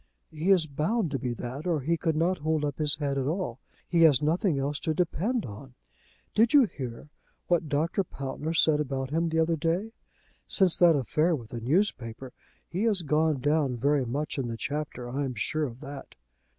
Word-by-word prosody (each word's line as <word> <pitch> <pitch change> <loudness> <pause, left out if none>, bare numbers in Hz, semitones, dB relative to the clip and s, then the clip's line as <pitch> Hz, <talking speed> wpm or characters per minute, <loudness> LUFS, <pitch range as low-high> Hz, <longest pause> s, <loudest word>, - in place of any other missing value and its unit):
"He 160 +4 -2
is 185 -5 +5
bound 160 +6 -1
to 135 - -1
be 125 -3 -2
that, 130 +8 -6
or 165 -5 +1
he 165 +6 +1
could 160 -1 -1
not 170 +3 +1
hold 155 0 0
up 145 0 -4
his 150 -1 +3
head 140 -2 -2
at 130 - -1
all. 155 -7 -2 0.3
He 170 -1 +2
has 150 -6 +6
nothing 160 +1 +1
else 140 +1 -2
to 160 - -2
depend 195 - 0
on. 125 +4 -10 0.6
Did 225 +6 +4
you 285 - +8
hear 130 - -6 0.4
what 170 -3 +1
Dr. 160 +7 0
Pountner 145 +1 -5
said 155 -2 +4
about 135 -2 -3
him 165 +2 +1
the 160 - -1
other 165 +1 +2
day? 175 +8 -1 0.6
Since 190 -4 +4
that 170 -2 +6
affair 155 +6 +1
with 115 -6 -9
the 120 - -5
newspaper, 130 - -1 0.3
he 180 - -3
has 205 -6 +3
gone 150 -2 +1
down 145 -3 +1
very 140 +3 +2
much 145 +4 -3
in 130 - -2
the 115 -1 -4
Chapter. 140 -2 -4
I 135 +4 -2
am 130 -2 -3
sure 150 +8 -1
of 125 -1 -8
that." 140 -1 -9
150 Hz, 200 wpm, -28 LUFS, 135-170 Hz, 0.6 s, you